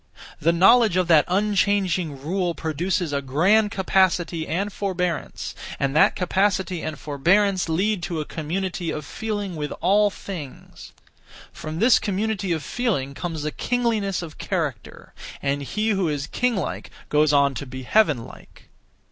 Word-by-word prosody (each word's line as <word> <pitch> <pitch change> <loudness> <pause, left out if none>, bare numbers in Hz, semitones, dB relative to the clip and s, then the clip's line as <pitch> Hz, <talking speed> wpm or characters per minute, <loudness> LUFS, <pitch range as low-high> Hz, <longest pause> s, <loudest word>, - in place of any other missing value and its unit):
The 165 - +3
knowledge 195 +3 +5
of 185 -2 +2
that 155 -3 +6
unchanging 190 -5 +1
rule 175 +4 -1
produces 165 +1 -2
a 140 - 0
(grand) 180 +11 +3
capacity 185 -5 +1
and 195 +5 -2
forbearance, 180 -4 -3 0.3
and 140 0 0
that 155 - +5
capacity 190 -1 0
and 155 -1 -4
forbearance 180 +6 +1
lead 190 +4 +1
to 170 -2 -3
a 155 - -3
community 175 +3 -3
(of 150 - -4
feeling 205 -1 -4
with 150 -1 -4
all 205 +4 +3
things). 175 -9 -9 0.6
From 155 0 -6
this 230 +7 +5
community 200 -1 -2
of 160 -3 -1
feeling 185 - -1
comes 160 0 -4
a 155 - -1
kingliness 220 -6 -1
of 155 -2 -10
character; 155 - -4 0.3
and 140 0 -1
he 215 +10 -2
who 195 -5 +1
is 145 -2 -2
king 250 +8 0
like 190 - -4 0.2
goes 150 0 +3
on 140 -1 +3
to 140 +1 -6
be 130 +1 -7
heaven 150 - +2
like. - - -16
180 Hz, 150 wpm, -23 LUFS, 150-200 Hz, 0.6 s, that